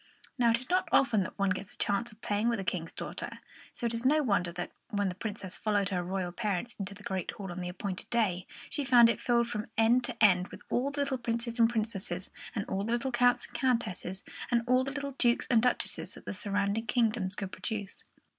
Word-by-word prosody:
Now, 240 Hz, -3 st, +4 dB
it 230 Hz, -, +4 dB
is 250 Hz, +1 st, -8 dB
not 365 Hz, -1 st, +1 dB
often 235 Hz, -6 st, +4 dB
that 185 Hz, -, -5 dB
one 200 Hz, -1 st, +2 dB
gets 195 Hz, +2 st, -3 dB
a -, -, -24 dB
chance 220 Hz, +4 st, +1 dB
of 215 Hz, +1 st, -19 dB
playing 210 Hz, +3 st, +1 dB
with 235 Hz, -3 st, 0 dB
a -, -, -2 dB
King's 165 Hz, -3 st, -2 dB
daughter, -, -, -5 dB, 0.3 s
so -, -, -5 dB
it 235 Hz, -, +1 dB
is 230 Hz, +1 st, -3 dB
no 300 Hz, +4 st, +4 dB
wonder 200 Hz, -7 st, +1 dB
that, 175 Hz, +1 st, -5 dB, 0.2 s
when 205 Hz, -4 st, 0 dB
the -, -, -3 dB
Princess 200 Hz, -1 st, -5 dB
followed 205 Hz, -2 st, +1 dB
her 180 Hz, -2 st, 0 dB
royal 180 Hz, 0 st, -2 dB
parents 210 Hz, +2 st, -2 dB
into 200 Hz, 0 st, -4 dB
the 205 Hz, -, -14 dB
great 190 Hz, -4 st, -3 dB
hall 200 Hz, -6 st, -5 dB
on 180 Hz, +1 st, -5 dB
the 180 Hz, -, -3 dB
appointed 185 Hz, +1 st, -4 dB
day, 195 Hz, -6 st, +1 dB, 0.2 s
she 290 Hz, -, -1 dB
found 240 Hz, -3 st, +7 dB
it -, -, -5 dB
filled 235 Hz, -1 st, +3 dB
from 210 Hz, -2 st, -3 dB
end 230 Hz, +3 st, +5 dB
to -, -, -5 dB
end 180 Hz, -3 st, +6 dB
with -, -, -11 dB
all 255 Hz, +3 st, +2 dB
the 285 Hz, 0 st, -2 dB
little 275 Hz, -2 st, -1 dB
princes 235 Hz, 0 st, -2 dB
and 230 Hz, 0 st, +6 dB
princesses 210 Hz, -5 st, -2 dB, 0.2 s
and 200 Hz, -, -1 dB
all 195 Hz, +1 st, -2 dB
the 230 Hz, +3 st, -1 dB
little 240 Hz, +2 st, 0 dB
counts 245 Hz, 0 st, +3 dB
and -, -, -17 dB
countesses 230 Hz, -7 st, -1 dB, 0.3 s
and 235 Hz, -1 st, +2 dB
all 255 Hz, +1 st, +4 dB
the 275 Hz, -, -3 dB
little 280 Hz, -1 st, -4 dB
dukes 240 Hz, -1 st, +3 dB
and 230 Hz, -2 st, +6 dB
duchesses 250 Hz, +1 st, 0 dB
that -, -, -13 dB
the -, -, -3 dB
surrounding 205 Hz, +2 st, -1 dB
kingdoms 215 Hz, -5 st, +1 dB
could 195 Hz, -2 st, -4 dB
produce. 205 Hz, -3 st, -5 dB
220 Hz, 235 wpm, -31 LUFS, 195-240 Hz, 0.3 s, found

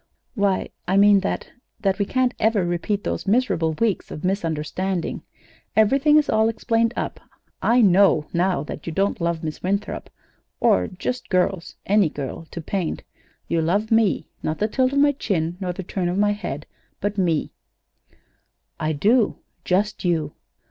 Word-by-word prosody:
"Why, 200 Hz, -5 st, 0 dB, 0.2 s
I 190 Hz, +2 st, +2 dB
mean 205 Hz, 0 st, +6 dB
that 195 Hz, -, -3 dB, 0.3 s
that 195 Hz, -2 st, +1 dB
we 200 Hz, -, +2 dB
can't 255 Hz, +2 st, +1 dB
ever 215 Hz, -4 st, +2 dB
repeat 175 Hz, +4 st, -2 dB
hose -, -, -3 dB
miserable 195 Hz, -8 st, +2 dB
weeks 215 Hz, +4 st, -1 dB
of 150 Hz, -, -8 dB
misunderstanding. 180 Hz, 0 st, -2 dB, 0.5 s
Everything 275 Hz, +8 st, +4 dB
is 300 Hz, -, +3 dB
all 220 Hz, +1 st, +3 dB
explained 230 Hz, 0 st, +1 dB
up. -, -, -3 dB, 0.4 s
I 245 Hz, +2 st, +4 dB
know, 190 Hz, -6 st, +5 dB
now, 175 Hz, -3 st, +1 dB
that 150 Hz, -, -8 dB
you 165 Hz, -, -3 dB
don't 195 Hz, +1 st, 0 dB
love 170 Hz, -1 st, -1 dB
Miss 155 Hz, -1 st, -5 dB
Winthrop, 200 Hz, +3 st, -2 dB, 0.5 s
or 90 Hz, -1 st, +3 dB
just 250 Hz, +7 st, -5 dB
girls 185 Hz, -2 st, 0 dB
any 200 Hz, -4 st, +3 dB
girl 145 Hz, +3 st, -6 dB
to 170 Hz, -, -6 dB
paint. 180 Hz, +1 st, -3 dB, 0.4 s
You 165 Hz, -, +1 dB
love 200 Hz, +7 st, 0 dB
me. 225 Hz, -4 st, +3 dB, 0.2 s
Not 155 Hz, -, -2 dB
the 215 Hz, -, +1 dB
tilt 255 Hz, +3 st, +1 dB
of 280 Hz, -, -1 dB
my 285 Hz, +1 st, +5 dB
chin, 175 Hz, -, -2 dB
nor 185 Hz, -2 st, -2 dB
the 190 Hz, +2 st, -6 dB
turn 180 Hz, 0 st, -2 dB
of 180 Hz, -, -2 dB
my 205 Hz, 0 st, +3 dB
head; 180 Hz, -8 st, -5 dB, 0.3 s
but 205 Hz, 0 st, -2 dB
me." 170 Hz, -5 st, +1 dB, 1.3 s
"I 155 Hz, 0 st, 0 dB
do 215 Hz, -, +3 dB, 0.3 s
just 200 Hz, +3 st, 0 dB
you." 160 Hz, -5 st, 0 dB
195 Hz, 160 wpm, -23 LUFS, 170-215 Hz, 1.3 s, mean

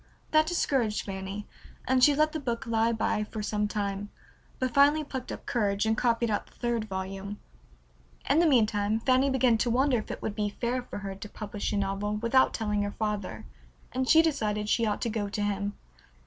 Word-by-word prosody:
That 310 Hz, 0 st, +4 dB
discouraged 265 Hz, -10 st, 0 dB
Fanny, 195 Hz, +1 st, -5 dB, 0.4 s
and 255 Hz, -1 st, +3 dB
she 290 Hz, +1 st, +7 dB
let 305 Hz, +1 st, +3 dB
the 315 Hz, -, -3 dB
book 240 Hz, -4 st, -3 dB
lie 230 Hz, 0 st, +2 dB
by 215 Hz, -1 st, 0 dB
for 215 Hz, 0 st, -6 dB
some 210 Hz, 0 st, 0 dB
time, 205 Hz, -1 st, -3 dB, 0.5 s
but 255 Hz, -2 st, -1 dB
finally 290 Hz, +3 st, +5 dB
plucked 260 Hz, -3 st, -6 dB
up -, -, -7 dB
courage, 205 Hz, -3 st, 0 dB
and 220 Hz, 0 st, +2 dB
copied 235 Hz, -1 st, +1 dB
out 205 Hz, -, -1 dB
the -, -, -23 dB
third 235 Hz, -2 st, -1 dB
volume. 195 Hz, +1 st, -5 dB, 0.9 s
In 280 Hz, +4 st, +4 dB
the 340 Hz, -, +5 dB
meantime 215 Hz, -5 st, +2 dB
Fanny 260 Hz, +3 st, +3 dB
began 255 Hz, -4 st, +3 dB
to 240 Hz, -, +1 dB
wonder 255 Hz, +1 st, +3 dB
if 215 Hz, -, -8 dB
it -, -, -6 dB
would 215 Hz, -, -2 dB
be 210 Hz, -1 st, -1 dB
fair 250 Hz, +1 st, 0 dB
for 245 Hz, -, -8 dB
her 195 Hz, -1 st, -5 dB
to 200 Hz, +2 st, -9 dB
publish 210 Hz, -1 st, -4 dB
a 205 Hz, -, 0 dB
novel 200 Hz, +1 st, -1 dB
without 235 Hz, +4 st, +3 dB
telling 210 Hz, -2 st, -1 dB
her 205 Hz, 0 st, -3 dB
father, 200 Hz, -, -3 dB, 0.5 s
and 260 Hz, 0 st, -1 dB
she 320 Hz, 0 st, +7 dB
decided 210 Hz, -9 st, 0 dB
she 230 Hz, 0 st, +2 dB
ought 210 Hz, -, -1 dB
to 235 Hz, -, 0 dB
go 210 Hz, -2 st, -2 dB
to 205 Hz, -, -3 dB
him. 205 Hz, 0 st, -1 dB
220 Hz, 205 wpm, -28 LUFS, 205-255 Hz, 0.9 s, she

